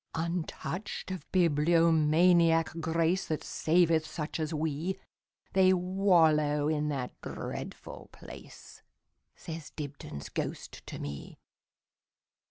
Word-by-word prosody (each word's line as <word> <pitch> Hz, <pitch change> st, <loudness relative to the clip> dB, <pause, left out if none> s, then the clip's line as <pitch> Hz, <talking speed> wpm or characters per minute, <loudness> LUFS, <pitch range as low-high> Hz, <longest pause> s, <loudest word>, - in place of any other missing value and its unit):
Untouched 170 Hz, +2 st, -4 dB
of 185 Hz, -, -7 dB
bibliomaniac 165 Hz, 0 st, +4 dB
grace, 165 Hz, +3 st, +1 dB
That 155 Hz, -, -2 dB
saveth 165 Hz, -1 st, +2 dB
such 155 Hz, 0 st, -5 dB
as 155 Hz, 0 st, -2 dB
we, 160 Hz, +3 st, -2 dB, 0.6 s
They 190 Hz, -1 st, +5 dB
wallow 165 Hz, -6 st, +3 dB
in 150 Hz, -1 st, 0 dB
that 130 Hz, -4 st, -3 dB
dreadful -, -, -7 dB
place,"Says 160 Hz, -2 st, -12 dB
Dibdin's 140 Hz, -, -7 dB
ghost -, -, -5 dB
to -, -, -6 dB
me. 70 Hz, 0 st, -7 dB
160 Hz, 90 wpm, -30 LUFS, 150-175 Hz, 0.6 s, They